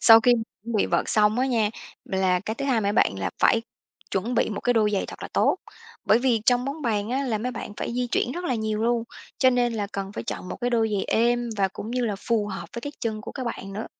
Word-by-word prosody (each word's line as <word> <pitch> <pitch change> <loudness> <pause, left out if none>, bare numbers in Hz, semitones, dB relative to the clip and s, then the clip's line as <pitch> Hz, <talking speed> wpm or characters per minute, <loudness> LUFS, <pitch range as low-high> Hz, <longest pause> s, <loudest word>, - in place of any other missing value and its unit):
Sau 225 -1 +9
khi 245 +2 +5
chuẩn 225 -1 -3
bị - - +3
vợt - - +1
xong 215 +2 +3
á 260 - +2
nha, 225 -5 +2 0.3
là 185 -1 +1
cái 220 +2 -4
thứ 275 - -4
hai 250 -5 +2
mấy 200 0 +1
bạn 95 - +2
là 95 - -1
phải 225 - +4 0.5
chuẩn 220 +6 -1
bị - - +2
một 205 - -4
cái 245 - +2
đôi 215 -2 +3
giày 195 - +1
thật - - -9
là - - -5
tốt. - - +3 0.5
Bởi 220 - +5
vì 245 -3 +2
trong 245 0 +4
bóng 280 +3 -4
bàn 215 -2 0
á 270 +2 0
là 230 -5 -1
mấy 250 +3 -3
bạn 210 - -6
phải - - -3
di 250 0 0
chuyển 240 +1 0
rất 355 +3 -5
là 255 - 0
nhiều 220 -1 -1
luôn, 235 0 +1 0.3
cho 260 - +5
nên 245 -1 +2
là 210 -2 -2
cần 195 0 -4
phải - - -5
chọn 185 - -5
một - - -5
cái 245 0 0
đôi 225 -2 +2
giày 195 - 0
êm, 240 +1 +1
và 195 -1 +2
cũng 210 +4 -7
như 250 0 0
là 205 -3 -1
phù 215 0 0
hợp 190 -1 -6
với 235 - -4
cái 290 +3 -5
chân 220 -2 -2
của - - -8
các 260 - -5
bạn 195 -4 -5
nữa. 215 +3 -4
225 Hz, 280 wpm, -25 LUFS, 210-245 Hz, 0.5 s, Sau